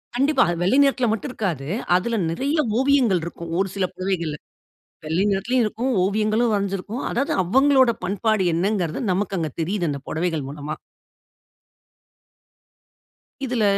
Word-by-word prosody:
கண்டிப்பா. 270 +1 +3 0.2
வெள்ளை 195 +9 +3
நேரத்துல 260 -3 +2
மட்டும் 225 +5 -3
இருக்காது. 165 - -3 0.3
அதுல 225 +5 0
நிறைய 280 - -1 0.2
ஓவியங்கள் 260 - +3
இருக்கும். 170 -1 -7
ஒரு 195 - +2
சில 195 -2 +1
புடவைகள்ல. 180 -5 -2 0.7
வெள்ளை 165 +6 0
நேரத்திலும் 235 +6 +1
இருக்கும். 225 +5 -2
ஓவியங்களும் 215 +3 +1
வரைஞ்சுருக்கும். 200 +4 -2
அதாவது, 275 +4 0
அவங்களோட 265 +6 +4
பண்பாடு 205 +1 +1
என்னங்கறது, 180 -2 0
நமக்கு 195 +1 -1
அங்க 160 -2 -2
தெரியுது, 175 +1 -1
அந்த 140 -1 -4
பொடவைகள் 160 -4 -2
மூலமா. 150 +1 -5 2.7
இதுல 240 -3 0
200 Hz, 120 wpm, -22 LUFS, 175-245 Hz, 2.7 s, அவங்களோட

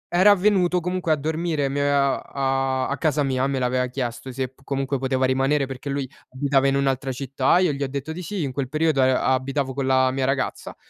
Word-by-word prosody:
era 195 +3 +7
avvenuto 185 -3 +3
comunque 180 -1 -2
a 155 - +5
dormire 155 -1 -1
mi 140 - -3
aveva 140 -1 +1
a 135 -1 -1
a 140 - -2
casa 150 0 +1
mia, 130 -1 0
me 135 -1 -1
l'aveva 125 0 +1
chiesto 125 0 -5
se 130 0 -4
comunque 135 0 -2
poteva 130 0 0
rimanere, 135 +2 +1
perché 135 +1 -7
lui 140 -2 -2 0.2
abitava 140 0 +2
in 135 - +2
un'altra 135 -1 0
città, 135 +5 +1
io 180 -4 +2
gli 140 0 -3
ho - - -1
detto 140 +3 -5
di 180 +3 -7
sì, 200 +1 -4
in 140 -4 -2
quel 130 -1 -3
periodo 155 0 +1
a 130 0 +2
abitavo 135 +1 -2
con 140 -1 -1
la 130 0 +3
mia 130 0 -1
ragazza. 135 0 -2
135 Hz, 215 wpm, -23 LUFS, 130-150 Hz, 0.2 s, era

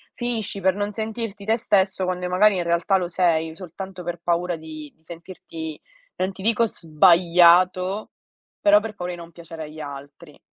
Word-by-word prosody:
finisci 225 -5 -3
per 190 0 +2
non 205 +1 -2
sentirti 220 -2 -5
te 225 +2 +2
stesso, 190 -3 +1
quando 180 0 -2
magari 200 +2 +4
in 175 - 0
realtà 170 +3 +2
lo 180 -2 -2
sei, 165 -3 +1
soltanto 185 +1 -8
per 170 0 -5
paura 175 +1 0
di 155 -2 -9
di 160 - -36
sentirti 165 -2 -9 0.4
non 185 +1 -1
ti 190 - -11
dico 230 +2 +2
sbagliato, 180 +2 +3 0.5
però 310 0 +5
per 225 - -6
paura 180 -3 -5
di - - -8
non 170 0 -11
piacere 165 -1 -9
agli 155 +1 -10
altri. 145 +2 -10
180 Hz, 170 wpm, -23 LUFS, 165-200 Hz, 0.5 s, però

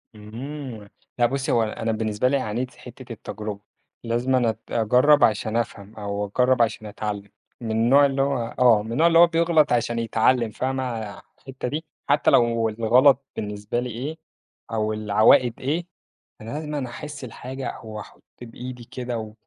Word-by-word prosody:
إمم. 115 +1 -8 0.3
لأ 120 - +5
بُصّي، 135 +2 -1
هو 115 - +3
أنا 110 +1 -2
بالنسبة 110 +1 0
لي 140 +2 +2
عانيت 125 +1 -3
في - - -21
حتّة 125 0 -10
التجربة 105 -2 -6 0.4
لازمًا 120 +3 +1
أنا 120 -2 +2
أت 110 -1 -4
أجرّب 125 +6 +4
عشان 110 0 +2
أفهم 110 -3 -4
أو 100 -1 -3
أجرّب 125 +4 +2
عشان 110 -1 0
أتعلّم. 105 -1 -5 0.3
من 115 -2 -3
النوع 120 +6 +5
اللي 135 -1 0
هو 135 -4 -1
آه، 120 -4 +6
من 110 - -7
النوع 155 +8 +4
اللي 165 -1 +5
هو 175 - +9
بيغلط 165 -2 +3
عشان 120 0 0
يتعلّم، 115 +1 +2
فاهمة 130 +4 -2
ع 110 -5 -5 0.2
الحتّة 135 -1 -7
دي؟ 155 +5 -4 0.2
حتى 145 +1 +4
لو 115 -1 +3
الغلط 125 +5 +4
بالنسبة 105 +2 -3
لي 125 +1 -3
إيه 135 +8 -5 0.5
أو 110 -1 0
العواقب 110 +4 +3
إيه، 160 +6 -2 0.5
أنا 110 - -8
لازمًا 150 -3 -4
أحس 145 +3 -8
الحاجة 130 +1 -6
أو 110 -1 -8
أحُط - - -13 0.2
بإيدي 125 +1 -8
كده 125 -1 -5
و 110 -1 -7
120 Hz, 170 wpm, -24 LUFS, 110-135 Hz, 0.5 s, هو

